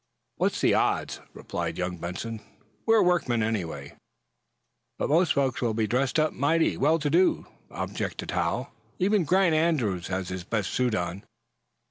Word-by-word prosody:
"What's - - 0
the - - +4
odds?" - - 0
replied - - -4
young 90 0 -2
Benson. 105 +6 -5 0.5
"We're 225 -2 +5
workmen, 140 -11 +2
anyway." 85 -10 -3 1.0
"But - - -1
most 170 +4 +4
folks 135 -3 0
will 115 -3 0
be 110 -1 +1
dressed 130 +6 +1
up 155 0 +2
mighty 160 +5 +2
well 155 +4 +3
to 150 -2 -1
day," 180 +4 +3 0.3
objected - - -4
Hal. - - -1 0.3
"Even 195 -1 +2
Grant 185 +1 +3
Andrews 135 - +1
has 95 -1 -3
his 90 -1 -5
best 105 0 -2
suit 125 -3 +1
on." 90 +1 -3
125 Hz, 150 wpm, -27 LUFS, -, 1.0 s, We're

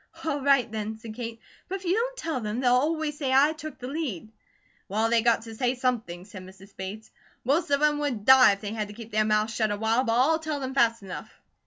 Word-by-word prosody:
"All 290 -3 -1
right 275 -4 +3
then," 220 0 -4
said 220 0 -9
Kate, 230 0 -6 0.3
"but 380 - -2
if 385 -1 -7
you 350 - +2
don't - - -1
tell 325 - -2
them, 215 +2 -3
they'll 250 -1 +3
always 300 +3 0
say 270 -3 -1
I 280 +4 +5
took 310 -1 -8
the 250 - -8
lead." 260 - -4 0.6
"Well, 220 +3 0
they 235 -1 +4
got 230 -1 +2
to 225 -1 -9
say 245 +2 0
something," 225 -9 -2
said 205 -2 -10
Mrs. 190 +2 -15
Bates. 200 +4 -7 0.3
"Most 295 +7 +1
of 285 +1 +2
'em 295 -1 +3
would 255 -8 -2
die 260 -5 +8
if 200 - -8
they 210 0 -4
had 215 -2 -3
to 205 - -11
keep 230 0 -10
their 215 0 +2
mouths 215 +1 +1
shut 220 -1 0
awhile; 220 +4 +1
but 230 -3 0
I'll 315 +5 +3
tell 310 -2 -3
them 265 -1 -4
fast 230 -4 +2
enough." 190 - -8
240 Hz, 240 wpm, -26 LUFS, 215-285 Hz, 0.6 s, die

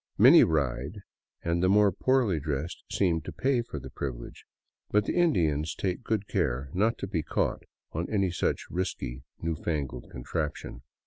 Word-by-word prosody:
Many - - +9
ride, 75 - -1 0.4
and 85 0 0
the 90 - +3
more 105 0 +5
poorly 120 -4 +2
dressed 75 +2 -3
seem 85 -4 +2
to - - -7
pay 130 -2 +1
for 95 -10 -6
the - - -10
privilege; 60 -4 -6 0.4
but 105 0 +3
the - - -1
Indians 80 - +2
take 90 -2 -2
good 105 -3 -1
care 65 +3 -1
not 110 +5 +2
to - - -4
be 90 -4 -1
caught - - -1 0.3
on 85 +2 -3
any 100 -4 +1
such 85 - -1
risky, 65 -9 -3 0.2
new 80 0 0
fangled 70 -6 -3
contraption. 70 -1 -4
85 Hz, 165 wpm, -28 LUFS, 70-100 Hz, 0.4 s, Many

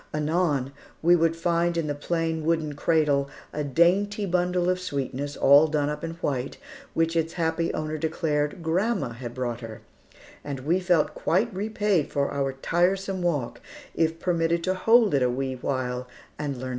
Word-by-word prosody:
Anon, 150 -3 0 0.3
we 175 +2 +6
would 165 -1 +2
find 170 0 0
in 165 - 0
the 145 - -1
plain 160 +2 -2
wooden 160 -2 0
cradle, 145 -2 +1 0.2
a 150 - -2
dainty 190 +8 +2
bundle 180 -1 +1
of 185 0 +1
sweetness, 140 -4 -4
all 145 +3 +6
done 150 -2 0
up 150 +1 -6
in 165 0 -3
white, 135 -2 -2 0.4
which 165 0 +1
its 165 0 0
happy 165 0 0
owner 155 0 -3
declared 155 0 -1
grandma 185 - 0
had 120 +1 -8
brought 120 -2 -3
her, 115 -2 -8 0.6
and 140 -2 -5
we 165 +7 +1
felt 175 -4 +2
quite 210 +7 0
repaid 205 -4 0
for 140 0 0
our 140 -1 0
tiresome 185 +6 0
walk 150 -9 -1 0.3
if 165 0 0
permitted 170 -1 0
to 185 - +1
hold 225 +2 +4
it 140 - +3
a 125 - +3
wee 130 +1 -2
while 125 -1 -3 0.3
and 145 -2 -2
learn - - -8
its - - -6
name. 130 - -4
160 Hz, 175 wpm, -26 LUFS, 140-175 Hz, 0.6 s, we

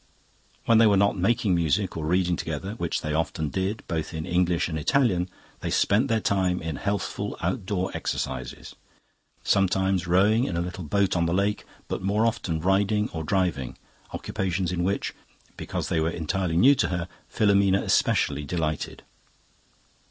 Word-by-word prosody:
"When 115 -1 +5
they 115 - +7
were 100 -2 +4
not 100 +1 +3
making 100 +1 +1
music 85 +3 +1
or 80 -2 -3
reading 90 +1 +2
together, 80 +4 -4
which 85 -7 -2
they 75 - -3
often 80 -1 -1
did, 95 +5 -2
both 80 0 -3
in 80 - -4
English 90 0 +1
and 80 -2 -3
Italian, 95 - +2 0.3
they - - -4
spent 110 +7 +2
their 115 -3 +1
time 95 -3 +1
in 80 -2 -4
healthful 100 -1 -3
outdoor 95 -1 -2
exercises, 65 -1 -4 0.7
sometimes 95 -1 +1
rowing 105 +7 +4
in 85 - -3
a - - +1
little 90 +1 -5
boat 100 +5 +1
on 85 -1 +1
the 85 - 0
lake, 100 +2 0 0.2
but - - -3
more 100 +4 +1
often 90 -8 -1
riding 100 +4 +1
or 80 -1 -5
driving, 85 -7 -1 0.3
occupations 90 -1 -2
in 85 -1 -1
which, 100 +2 -1 0.4
because - - -4
they 80 - +1
were 80 +1 +1
entirely 85 +1 -1
new 135 +11 +7
to 140 - +1
her, 90 -1 -3 0.2
Filomena 100 -2 +3
especially 75 0 +1
delighted. 80 -1 -3
90 Hz, 160 wpm, -26 LUFS, 85-100 Hz, 0.7 s, they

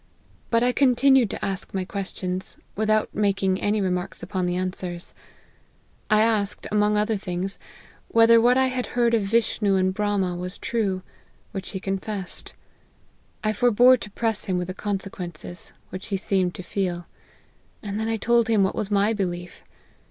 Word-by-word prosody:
But 230 0 +3
I 250 - +4
continued 265 -2 +4
to - - -4
ask 195 0 -4
my 190 -1 -1
questions, 185 -1 -4 0.2
without 215 +1 +1
making 195 -2 +1
any 210 +1 +1
remarks 180 -1 -2
upon 185 -2 -2
the 175 - -1
answers. 180 -1 -4 1.0
I 215 -1 +5
asked, 215 -3 +1
among 210 0 +3
other 210 +1 +1
things, 190 0 -4 0.5
whether 230 0 +6
what 245 +2 +5
I 265 - +4
had 255 -1 -2
heard 235 -1 +3
of 230 - +4
Vishnu 205 -1 +1
and 185 0 +2
Brahma 200 -3 0
was 180 +1 -5
true; 205 -7 -1 0.5
which 195 -3 -5
he 190 - -4
confessed. 195 0 -4 0.9
I 215 0 +1
forbore 245 +3 +5
to 210 - -7
press 220 +1 0
him 185 -3 0
with 180 0 -3
the - - -3
consequences, 185 -4 -5 0.2
which 185 +1 -6
he 200 - -1
seemed 185 -2 0
to 185 - -7
feel; 175 -2 -2 0.8
and 205 0 -3
then 220 - -1
I 225 0 0
told 235 +1 +3
him 220 -3 +3
what 190 - +1
was 205 - -3
my 205 +2 +3
belief. 175 -4 -4
200 Hz, 165 wpm, -24 LUFS, 185-225 Hz, 1.0 s, whether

